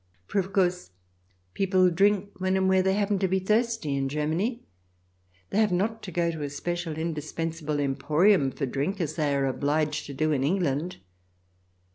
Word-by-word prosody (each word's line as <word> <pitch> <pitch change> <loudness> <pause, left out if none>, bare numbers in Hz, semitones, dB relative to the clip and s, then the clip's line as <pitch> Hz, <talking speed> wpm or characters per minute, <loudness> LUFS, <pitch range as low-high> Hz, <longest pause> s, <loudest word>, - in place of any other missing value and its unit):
For, 200 - -1
of 190 0 -3
course, 180 - +1 0.6
people 185 -2 +3
drink 200 +2 +2
when 185 0 +1
and 190 0 +2
where 190 0 +4
they 190 +1 +2
happen 205 -1 +1
to 190 - +1
be 190 +1 +1
thirsty 215 - 0
in 135 0 -1
Germany; 160 - -1 0.9
they 210 - +1
have 215 -3 +3
not 215 +5 0
to 185 - -7
go 170 0 +1
to 160 -2 -6
a 145 - -2
special, 170 +2 -4
indispensable 160 -1 -3
emporium 145 +4 +3
for 135 +2 -3
drink 140 +10 -2
as 160 -3 -1
they 150 -3 0
are 140 -1 +1
obliged 150 +3 0
to 140 - -7
do 155 +3 +1
in 135 -3 +1
England. 170 0 0
175 Hz, 175 wpm, -27 LUFS, 150-190 Hz, 0.9 s, where